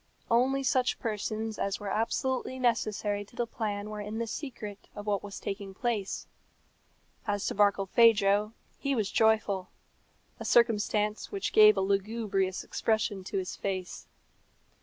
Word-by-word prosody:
Only 265 Hz, +4 st, +3 dB
such 255 Hz, -1 st, +2 dB
persons 220 Hz, 0 st, -3 dB
as 200 Hz, 0 st, -1 dB
were 205 Hz, -2 st, -4 dB
absolutely 260 Hz, +4 st, -1 dB
necessary 215 Hz, -4 st, 0 dB
to 205 Hz, -, -19 dB
the 240 Hz, -, 0 dB
plan 210 Hz, -3 st, -4 dB
were 210 Hz, -1 st, -5 dB
in 210 Hz, +2 st, -5 dB
the 230 Hz, -, -1 dB
secret 220 Hz, -5 st, -7 dB
of 205 Hz, -1 st, -7 dB
what 205 Hz, -2 st, 0 dB
was 200 Hz, -1 st, -8 dB
taking 195 Hz, -1 st, -5 dB
place. 220 Hz, -4 st, -2 dB, 1.0 s
As 205 Hz, -1 st, -1 dB
to -, -, -1 dB
Barkilphedro, 205 Hz, +1 st, +4 dB, 0.3 s
he 275 Hz, -1 st, 0 dB
was 215 Hz, -5 st, -1 dB
joyful 215 Hz, -4 st, +2 dB, 0.7 s
a -, -, -5 dB
circumstance 210 Hz, -2 st, +2 dB
which 400 Hz, -1 st, -3 dB
gave 430 Hz, 0 st, +8 dB
a -, -, +2 dB
lugubrious 195 Hz, -1 st, 0 dB
expression 215 Hz, -3 st, -1 dB
to 195 Hz, -, -3 dB
his 185 Hz, -1 st, -3 dB
face. 185 Hz, -2 st, -4 dB
210 Hz, 140 wpm, -29 LUFS, 200-230 Hz, 1.0 s, gave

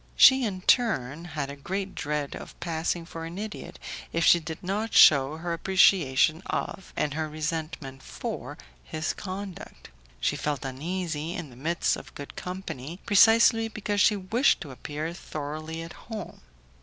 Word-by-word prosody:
She, 265 Hz, 0 st, +8 dB
in 195 Hz, -5 st, -2 dB
her -, -, -23 dB
turn, 165 Hz, -, +2 dB
had 150 Hz, -4 st, -4 dB
a -, -, -7 dB
great 190 Hz, +7 st, -4 dB
dread 150 Hz, 0 st, -3 dB
of -, -, -10 dB
passing 165 Hz, 0 st, -2 dB
for 165 Hz, -1 st, -7 dB
an 165 Hz, +2 st, -7 dB
idiot 210 Hz, +1 st, -6 dB, 0.3 s
if 165 Hz, 0 st, +1 dB
she 170 Hz, -, +7 dB
did 160 Hz, 0 st, -7 dB
not 205 Hz, +4 st, -2 dB
shew 140 Hz, -1 st, +7 dB
her 170 Hz, +2 st, -3 dB
appreciation 165 Hz, -4 st, +4 dB
of, 190 Hz, -, -4 dB
and 145 Hz, -, 0 dB
her 155 Hz, 0 st, -2 dB
resentment 155 Hz, -3 st, -4 dB
for, -, -, -6 dB, 0.3 s
his 155 Hz, 0 st, -3 dB
conduct. 190 Hz, -, -8 dB, 0.3 s
She -, -, +1 dB
felt 145 Hz, -3 st, -2 dB
uneasy 160 Hz, +3 st, -3 dB
in 160 Hz, -6 st, -6 dB
the -, -, -14 dB
midst 165 Hz, +7 st, 0 dB
of 150 Hz, -, -12 dB
good 145 Hz, -, -8 dB
company, 175 Hz, -4 st, -6 dB
precisely 225 Hz, +1 st, +6 dB
because 210 Hz, -2 st, -1 dB
she 215 Hz, -, +5 dB
wished 215 Hz, +7 st, +2 dB
to 145 Hz, -, -7 dB
appear 150 Hz, +5 st, -5 dB
thoroughly 155 Hz, +1 st, -6 dB
at 165 Hz, -, -9 dB
home. 220 Hz, -5 st, -8 dB
165 Hz, 160 wpm, -27 LUFS, 150-190 Hz, 0.3 s, She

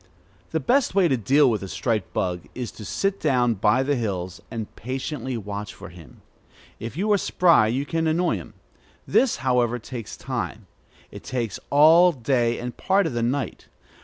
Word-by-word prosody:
The 160 Hz, -, -1 dB
best 245 Hz, -, +1 dB
way 190 Hz, -3 st, +5 dB
to 135 Hz, -, +2 dB
deal 135 Hz, +6 st, +4 dB
with 110 Hz, -4 st, +1 dB
the 95 Hz, -, -5 dB
striped 110 Hz, +1 st, -2 dB
bug 90 Hz, -2 st, -2 dB
is 125 Hz, -2 st, -4 dB
to 105 Hz, -, -10 dB
sit 195 Hz, -, -1 dB
down 125 Hz, -5 st, +2 dB
by 110 Hz, +5 st, +2 dB
the 145 Hz, +1 st, +1 dB
hills, 95 Hz, -7 st, -3 dB
and 110 Hz, -2 st, -6 dB
patiently 130 Hz, +1 st, -4 dB
watch 105 Hz, -1 st, -6 dB
for -, -, -10 dB
him. 85 Hz, -3 st, -15 dB, 0.6 s
If 115 Hz, +5 st, -7 dB
you 210 Hz, +4 st, 0 dB
are 205 Hz, -, +4 dB
spry, 170 Hz, -14 st, +4 dB
you 130 Hz, +5 st, -1 dB
can 165 Hz, +1 st, -1 dB
annoy 170 Hz, +3 st, +1 dB
him. -, -, -11 dB, 0.5 s
This, 260 Hz, -2 st, +3 dB
however, 125 Hz, -2 st, +2 dB
takes 115 Hz, -2 st, -8 dB
time. 120 Hz, -4 st, -4 dB, 0.5 s
It -, -, -10 dB
takes 120 Hz, -6 st, -3 dB
all 160 Hz, +5 st, +7 dB
day 120 Hz, -3 st, 0 dB
and 125 Hz, 0 st, -5 dB
part 195 Hz, +1 st, +2 dB
of 160 Hz, -, -2 dB
the 120 Hz, -, -1 dB
night. 130 Hz, +4 st, -2 dB
125 Hz, 180 wpm, -24 LUFS, 110-155 Hz, 0.6 s, all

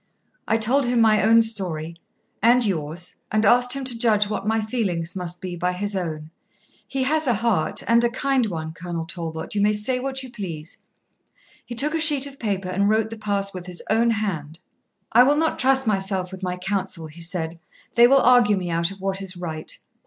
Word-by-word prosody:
I 225 Hz, -, +2 dB
told 245 Hz, +4 st, +2 dB
him 245 Hz, -1 st, +1 dB
my 220 Hz, -2 st, +4 dB
own 230 Hz, +1 st, +5 dB
story 175 Hz, -7 st, -3 dB, 0.5 s
and 240 Hz, +3 st, +4 dB
yours; 175 Hz, -2 st, -3 dB
and 215 Hz, +1 st, +2 dB
asked 245 Hz, +3 st, +4 dB
him 275 Hz, 0 st, -3 dB
to 255 Hz, -2 st, -1 dB
judge 215 Hz, -3 st, +3 dB
what 210 Hz, -1 st, -4 dB
my 225 Hz, +1 st, +2 dB
feelings 200 Hz, -7 st, -2 dB
must 175 Hz, -1 st, -4 dB
be 180 Hz, -1 st, -5 dB
by 180 Hz, +1 st, -1 dB
his 205 Hz, +2 st, -3 dB
own. 160 Hz, -4 st, -4 dB, 0.6 s
He 270 Hz, -1 st, -2 dB
has 310 Hz, +2 st, +1 dB
a 245 Hz, -, +3 dB
heart, 210 Hz, -7 st, 0 dB
and 235 Hz, +1 st, +4 dB
a 240 Hz, -, +3 dB
kind 260 Hz, -1 st, 0 dB
one, 160 Hz, -4 st, -5 dB
Colonel 170 Hz, -1 st, -5 dB
Talbot, 165 Hz, -1 st, -6 dB
you 205 Hz, -, 0 dB
may 210 Hz, +1 st, +3 dB
say 230 Hz, +5 st, 0 dB
what 265 Hz, +1 st, -3 dB
you 255 Hz, -, -10 dB
please. 180 Hz, -6 st, -7 dB, 0.8 s
He 240 Hz, -, -8 dB
took 295 Hz, +6 st, +2 dB
a 325 Hz, -, 0 dB
sheet 295 Hz, -3 st, +5 dB
of 275 Hz, -1 st, -10 dB
paper 195 Hz, -4 st, -2 dB
and 200 Hz, +2 st, +1 dB
wrote 220 Hz, +1 st, +1 dB
the -, -, -5 dB
pass 200 Hz, -2 st, -2 dB
with 180 Hz, -1 st, -8 dB
his 180 Hz, -1 st, -5 dB
own 230 Hz, +2 st, +3 dB
hand. 175 Hz, -9 st, -2 dB, 0.5 s
"I 235 Hz, -, +6 dB
will 285 Hz, +4 st, +4 dB
not 320 Hz, 0 st, 0 dB
trust 265 Hz, +1 st, +3 dB
myself 195 Hz, -3 st, -1 dB
with 190 Hz, 0 st, -9 dB
my 180 Hz, -1 st, -3 dB
council," 190 Hz, -2 st, -3 dB
he 160 Hz, +2 st, -10 dB
said; 165 Hz, -1 st, -3 dB, 0.3 s
"they 240 Hz, 0 st, +7 dB
will 275 Hz, +1 st, +5 dB
argue 245 Hz, -5 st, +5 dB
me 180 Hz, -2 st, -3 dB
out 170 Hz, +1 st, 0 dB
of 195 Hz, -1 st, -11 dB
what 195 Hz, 0 st, -1 dB
is 190 Hz, -2 st, -5 dB
right. 160 Hz, -3 st, -6 dB
205 Hz, 210 wpm, -23 LUFS, 180-240 Hz, 0.8 s, they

